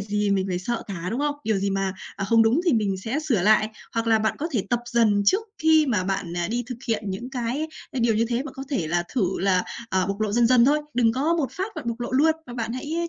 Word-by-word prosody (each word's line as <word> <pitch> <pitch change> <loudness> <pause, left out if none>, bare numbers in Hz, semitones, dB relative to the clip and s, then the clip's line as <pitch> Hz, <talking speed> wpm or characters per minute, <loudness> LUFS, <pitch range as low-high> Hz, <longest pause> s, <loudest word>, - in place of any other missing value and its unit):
gì 210 0 -1
mình 195 -1 +1
phải 180 -1 -1
sợ 235 +5 -3
cả, 180 -3 -5
đúng 245 +5 -2
không? 295 0 0
Điều 215 -2 +1
gì 200 0 -1
mà, 195 -1 -1 0.2
ờ, 195 - -2
không 225 +2 +4
đúng 235 +9 +3
thì 340 - +3
mình 205 -4 +1
sẽ 225 +10 -3
sửa 245 - 0
lại, 215 +1 +4 0.3
hoặc 230 0 -1
là 225 -1 +4
bạn 220 0 0
có 320 +4 -2
thể 205 -5 -1
tập 240 0 +1
dần 215 -4 +3
trước 390 - +4 0.2
khi 315 -1 +4
mà 210 -8 +1
bạn, 190 -3 -2
ờ, 175 +1 -2
đi 240 +2 -1
thực 250 -2 -6
hiện 215 -2 0
những 240 +7 -5
cái, 260 +5 -2 0.2
ờ, 260 - -3
điều 230 -2 +3
như 225 +2 +2
thế 240 +2 0
và 300 - -6
có 270 0 -6
thể 180 - -1
là 175 +1 +1
thử 190 -6 0
là, 185 -2 +2 0.3
ờ, 190 -1 +1
bộc 200 +2 -3
lộ 210 -1 0
dần 235 +1 +4
dần 245 -1 +5
thôi. 295 +3 +4 0.2
Đừng 230 -2 +3
có 295 +7 +1
một 300 -6 -1
phát 390 +2 -4
bạn 310 - -5
bộc 235 +1 -4
lộ 240 - -3
luôn 315 +4 +4
và 240 - -8
bạn 230 -1 -3
hãy 320 +6 -3
230 Hz, 285 wpm, -24 LUFS, 200-265 Hz, 0.3 s, dần